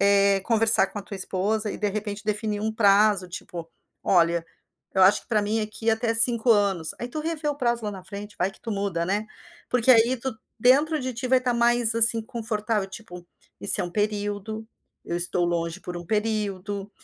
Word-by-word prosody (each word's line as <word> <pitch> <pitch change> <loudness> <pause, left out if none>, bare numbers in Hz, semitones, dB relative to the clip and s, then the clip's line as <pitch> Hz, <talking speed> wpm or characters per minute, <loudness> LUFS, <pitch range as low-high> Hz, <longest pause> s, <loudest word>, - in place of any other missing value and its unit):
eh, 200 0 +4
conversar 225 -1 +3
com 200 - -7
a - - -6
tua 200 - -9
esposa 205 +3 -1
e, - - -5
de 210 - 0
repente, 210 0 -5
definir 210 0 -2
um 220 +1 -2
prazo, 205 -3 +3
tipo: 170 -1 -8 0.3
"Olha, 170 -2 +2 0.5
eu 190 - +3
acho 190 +2 +5
que - - -27
pra 220 -3 +2
mim 215 +2 -1
é 215 - -2
que 220 +1 -5
é 225 - +5
até 225 +1 0
5 235 +1 +5
anos". 200 -7 +2
Aí 240 - -4
tu 305 +5 -5
revê 315 -1 -4
o 290 - -1
prazo 235 -4 -1
lá 210 - -3
na 190 -2 -9
frente, 205 +2 -9
vai 195 - 0
que 195 - -19
tu 225 - -5
muda, 195 -4 -2
né. 205 +3 -1 0.4
Porque 250 +1 +2
aí 235 +3 +4
tu, 245 -1 -5 0.2
dentro 285 +7 +3
de 255 -3 -4
ti, 255 +1 -4
vai 260 0 +4
tá 250 -1 -1
mais, 235 -1 +2
assim, 230 0 +5
confortável, 220 -2 -3
tipo: 180 -5 -10 0.4
"isso - - +3
é - - -1
um 175 - -6
período, 210 +1 -3 0.4
eu 170 - -3
estou 175 0 +1
longe 170 -1 -2
por 180 - -7
um 175 - -11
período". 205 -2 -2
210 Hz, 210 wpm, -25 LUFS, 195-230 Hz, 0.5 s, acho